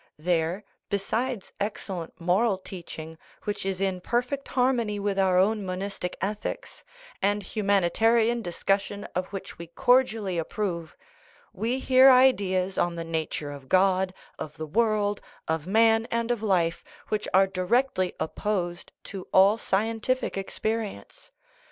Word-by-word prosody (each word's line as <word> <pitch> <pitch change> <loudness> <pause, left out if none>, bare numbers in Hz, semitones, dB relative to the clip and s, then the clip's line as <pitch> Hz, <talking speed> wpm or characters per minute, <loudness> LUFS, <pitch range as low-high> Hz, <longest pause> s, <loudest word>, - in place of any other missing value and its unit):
There, 170 +4 0 0.3
besides 225 +3 -2
ex 205 +1 -3
cellent 175 -5 -5
moral 190 +5 +2
teaching, 165 -4 -9 0.2
which 205 -2 -3
is 190 -1 -2
in 190 -2 -1
perfect 250 +6 -1
harmony 245 -5 +1
with 200 -1 -1
our 190 -1 +3
own 210 +3 +3
monistic 185 -1 -4
ethics, 205 +3 -4 0.4
and 205 +1 +1
humanitarian 220 +4 +2
discussion 195 +2 -1
of 180 +1 -1
which 195 -4 -8
we 170 - -7
cordially 215 -1 +2
approve, 170 -2 -3 0.6
we 230 +6 -1
hear 260 0 +6
ideas 195 -8 +4
on 175 -1 +1
the 165 - -4
nature 160 -2 -3
of 140 -2 -10
God, 190 0 +3 0.3
of 155 -1 -7
the 155 - -4
world, 210 +3 +1 0.3
of 160 0 -1
man, 225 +2 +4
and 235 0 0
of 240 -3 -1
life 180 -6 +1 0.3
which 215 -1 -1
are 190 +1 +6
directly 190 +1 0
opposed 175 +1 -2
to 195 -2 -8
all 200 +4 +5
scientific 225 +6 0
experience. 210 - -4
195 Hz, 135 wpm, -27 LUFS, 180-225 Hz, 0.6 s, hear